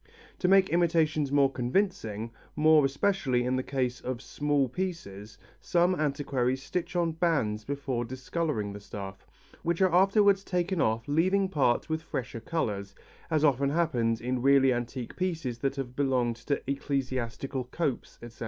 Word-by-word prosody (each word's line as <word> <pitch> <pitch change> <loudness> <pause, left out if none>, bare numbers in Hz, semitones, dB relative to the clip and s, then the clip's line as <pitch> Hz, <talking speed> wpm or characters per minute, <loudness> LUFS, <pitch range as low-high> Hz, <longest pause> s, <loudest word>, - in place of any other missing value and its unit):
To 180 - +1
make 190 0 +5
imitations 160 -4 +2
more 140 -1 +4
convincing, 120 - -1 0.2
more 155 0 +5
especially 135 -3 +1
in 125 +1 0
the 130 - 0
case 130 -2 -2
of 125 -2 -4
small 145 0 0
pieces, 120 - -5 0.2
some 175 +1 +2
antiquaries 140 -5 -1
stitch 180 +3 -4
on 170 -2 +1
bands 150 -11 0
before 135 -2 -3
discolouring 130 -3 -3
the 100 - -7
stuff, 100 -1 -8 0.3
which 170 0 -1
are 185 -3 +3
afterwards 195 +1 +4
taken 180 -2 -1
off 110 +4 0
leaving 185 +6 +2
parts 140 -9 +1
with 160 0 -2
fresher 125 -6 -5
colours, 105 -8 -3 0.3
as 155 -2 +2
often 140 -1 +3
happens 125 -8 +1
in 125 +1 -2
really 135 -1 +5
antique 120 0 -4
pieces 165 -10 -2
that 135 +2 -1
have 130 -3 -5
belonged 125 -4 +1
to 140 +4 -2
ecclesiastical 130 -2 -2
copes, 135 0 -3
etc. 120 -1 -11
140 Hz, 150 wpm, -28 LUFS, 120-165 Hz, 0.3 s, make